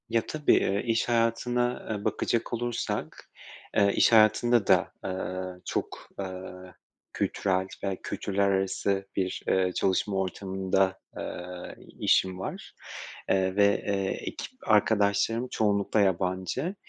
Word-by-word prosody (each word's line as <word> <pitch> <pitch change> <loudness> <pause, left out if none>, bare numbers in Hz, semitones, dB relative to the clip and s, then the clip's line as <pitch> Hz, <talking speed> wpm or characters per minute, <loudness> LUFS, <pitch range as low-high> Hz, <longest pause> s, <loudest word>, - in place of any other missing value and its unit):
Ya, 115 -1 +1
tabii, 150 -2 +2
eee, 100 +1 +1
iş 115 0 +1
hayatına, 120 +1 +1
eee, 105 -2 -3
bakacak 115 0 -1
olursak, 120 0 -3 0.5
eee, 100 0 +4
iş - - +5
hayatında 115 +1 +5
da, - - +4
eee, 95 -1 -4
çok, - - -4
eee, 95 -1 -4 0.7
kültürel 95 -1 0 0.2
ve 95 -1 -1
kültürler 100 0 -1
arası 95 0 0
bir, 95 -1 -2
eee, 95 -1 +2
çalışma 95 +1 +1
ortamında, 95 0 0 0.2
eee, 90 0 -6
i - - -14
işim 95 -1 +3
var, 95 - -6 0.6
eee, 95 0 +2
ve 100 0 +5 0.6
ekip - - -6 0.2
arkadaşlarım 110 +2 +3
çoğunlukla 105 -1 +1
yabancı. 95 - 0
100 Hz, 115 wpm, -28 LUFS, 95-115 Hz, 0.7 s, iş